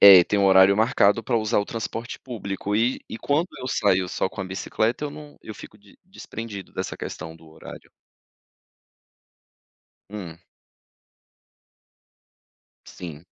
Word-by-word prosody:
É, 95 -3 +11
tem 105 - 0
o 100 - +3
horário 95 0 +7
marcado 110 -1 +3
pra 120 - +1
usar 110 0 +1
o 100 - +1
transporte 115 +1 -5
público 105 -4 -4
e 120 +4 +1
e - - -5
quando 150 +8 +1
eu 130 - -5
saio 95 -5 +2
só 95 - -1
com 100 - -8
a - - -2
bicicleta 110 +7 -1
eu 145 - -3
num 150 0 -11
eu 110 - -8
fico 105 - -12
de 100 -1 -21
desprendido 115 - -8
dessa - - -4
questão 80 0 -7
do 80 -1 -17
horário. 80 - -12 2.2
Hum. 90 -6 -7 2.5
Sim. 80 -2 -9
105 Hz, 140 wpm, -24 LUFS, 95-115 Hz, 2.5 s, É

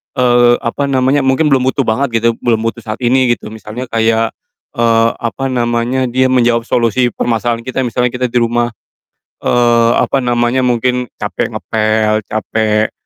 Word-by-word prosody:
eee, 120 -1 +4
apa 140 +4 -2
namanya, 135 +1 +2
mungkin 135 +4 +2
belum 130 -2 +3
butuh 135 +1 +1
banget 115 0 0
gitu, 115 - +4
belum 115 -2 0
butuh 115 +1 -3
saat 110 0 -5
ini 125 0 +3
gitu 105 - -11
misalnya 110 +2 -7
kayak, 115 0 +1 0.5
eee, 115 -1 +3
apa 120 +3 -3
namanya, 120 +1 0
dia 130 +2 +1
menjawab 120 -2 +2
solusi 120 +1 +1
permasalahan 115 0 -1
kita, 130 +1 -1
misalnya 125 0 0
kita 125 0 -1
di 125 - +2
rumah, 120 0 0 0.7
eee, 120 -1 +3
apa 135 - +1
namanya, 120 +1 +1
mungkin 125 +1 0
capek - - -3
ngepel, 110 -1 0
capek, 110 0 0
120 Hz, 155 wpm, -14 LUFS, 115-125 Hz, 0.7 s, eee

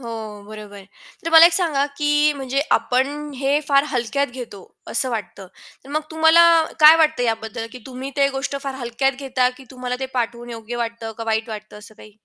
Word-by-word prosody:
हो, 220 -4 -7
बरोबर 210 -1 -10
आहे. 195 - -13 0.4
तर 330 - -2
मला 325 +1 +10
एक 345 - +1
सांगा 320 -6 +1
की 295 0 +2
म्हणजे 270 +1 -1
आपण 285 +4 0
हे 275 +3 +1
फार 275 0 +4
हलक्यात 280 +2 -1
घेतो 240 -6 -9 0.3
असं 255 +2 0
वाटतं. 200 -3 -6 0.4
तर - - -15
मग 305 +1 -1
तुम्हाला 320 +1 +5 0.4
काय 310 +2 +9
वाटतं 310 -5 +2
याबद्दल, 225 -1 -3
की 250 - -9
तुम्ही 265 +1 -7
ते 275 0 +3
गोष्ट 270 +1 -4
फार 275 -1 -4
हलक्यात 265 +2 -1
घेता, 255 -2 +1
की 265 - -14
तुम्हाला 250 -1 -5
ते 265 - -2
पाठवून 240 0 -3
योग्य 230 +1 -7
वाटतं 230 -1 -4
का, 230 - -5
वाईट 220 +1 -1
वाटतं 215 -1 -9
असं 210 +1 -15
काही? 215 0 -16
255 Hz, 195 wpm, -21 LUFS, 225-280 Hz, 0.4 s, मला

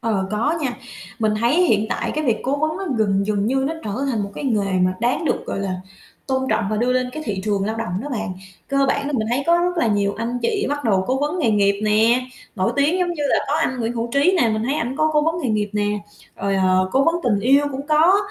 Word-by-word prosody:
Ờ, 205 -4 -1
có 230 +9 0
nha. 255 -4 -2 0.4
Mình 215 -2 +1
thấy 280 +10 +3
hiện 215 -8 +2
tại, - - -2
cái, 310 0 -1
việc 230 -4 +1
cố 270 +3 0
vấn 310 +1 -1
nó 390 - -4
gần 200 -2 +1
dần 205 -1 0
như 265 +2 +1
nó 325 - -3
trở 210 - -3 0.2
thành 220 -4 -1
một, 200 - -5
cái, - - -6
nghề 210 -7 0
mà 185 0 +2
đáng 245 +7 0
được, - - -1
gọi - - -3
là, 190 -2 -2 0.5
tôn 265 0 -1
trọng 225 - +1
và 215 - 0
đưa 245 +3 +1
lên, 255 0 0
cái, 310 - -5
thị 200 -4 -2
trường 200 -2 0
lao 220 +2 -2
động 215 -5 -3
đó 290 - -5
bạn. 225 -8 -3 0.4
Cơ 275 0 +2
bản 280 +1 0
là 295 - -3
mình 220 -5 0
thấy 265 +3 +1
có 340 0 +4
rất 355 +1 0
là 335 - +2
nhiều 205 -2 +1
anh 235 +2 -2
chị 420 -3 0
bắt 290 -1 -3
đầu 195 -4 +2
cố 260 +1 0
vấn 300 +5 -1
nghề 260 -9 +2
nghiệp 200 -1 +2
nè, 225 +4 +3 0.3
nổi 185 - +1
tiếng 295 +6 +2
giống 355 -1 0
như 300 - -4
là - - +3
có 290 - +1
anh 260 -6 -1
Nguyễn 230 +1 -1
Hữu 235 0 -3
Trí 315 +7 +3
nè, 230 - +3
mình 215 0 -1
thấy 270 +4 0
ảnh 255 -2 -2
có 310 0 +2
cố 300 -1 +3
vấn 325 +2 +1
nghề 255 - 0
nghiệp 210 -1 0
nè, 210 0 0 0.4
rồi, 200 0 -1
ờ, 185 0 +2
cố 270 +1 +3
vấn 330 - +3
tình 210 -5 +2
yêu 275 +6 +4
cũng 275 +2 -5
có, 320 +5 +5
240 Hz, 275 wpm, -21 LUFS, 210-290 Hz, 0.5 s, có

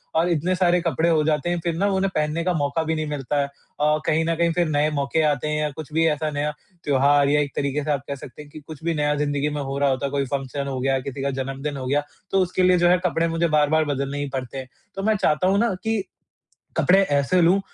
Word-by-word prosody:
और 165 +2 +2
इतने 175 +2 +1
सारे 180 -1 +3
कपड़े 165 0 +1
हो 160 -2 +3
जाते 150 +1 0
हैं 175 0 0
फिर 170 -1 -1
न 190 - -1
वो 195 - 0
उन्हें 195 +1 +1
पहनने 155 +2 0
का 180 +1 +1
मौक़ा 145 0 0
भी 160 0 -1
नहीं 155 0 -2
मिलता 145 0 -2
है। - - 0
अ, 150 +2 -2
कहीं 160 +1 +2
न 165 0 0
कहीं 170 +1 +2
फिर 175 0 +1
नए 150 0 +2
मौक़े 140 +3 0
आते 145 +1 -2
हैं 150 0 -1
या 150 - 0
कुछ 155 +1 -9
भी 165 +1 +3
ऐसा 155 0 0
नया 145 +1 -1 0.3
त्योहार 140 0 +3
या 150 +1 +3
एक 145 -1 -3
तरीक़े 140 +1 -1
से 150 - -1
आप 140 -2 -1
कह 140 - -3
सकते 135 +1 -11
हैं 150 - -13
कि 155 - -9
कुछ 155 -1 -10
भी 170 0 0
नया 150 -1 +1
ज़िन्दगी 145 0 0
में 145 0 -3
हो 135 0 -4
रहा 140 0 +3
होता 130 +1 -1
है - - -1
कोई 140 -1 0
फ़ंक्शन 140 +1 -3
हो 135 -2 -3
गया, 135 +1 +1
किसी 135 +1 -6
का 140 - 0
जन्मदिन 135 +2 -4
हो 130 - -5
गया 145 +2 +1 0.3
तो 195 - +3
उसके 185 0 0
लिए 180 0 +5
जो 175 0 +3
है 180 - +5
कपड़े 165 -1 +1
मुझे 165 +1 0
बार-बार 155 0 +2
बदलने 140 -1 -2
ही 145 -1 -3
पड़ते 130 0 -4
हैं। 130 -1 -6 0.3
तो 195 - -4
मैं 220 +1 +2
चाहता 185 -2 +1
हूँ 195 +1 +3
न 230 -5 0
कि 220 -2 0 0.7
कपड़े 190 +2 +5
ऐसे 145 +5 +2
लूँ 180 +4 +4
150 Hz, 275 wpm, -23 LUFS, 140-170 Hz, 0.7 s, लिए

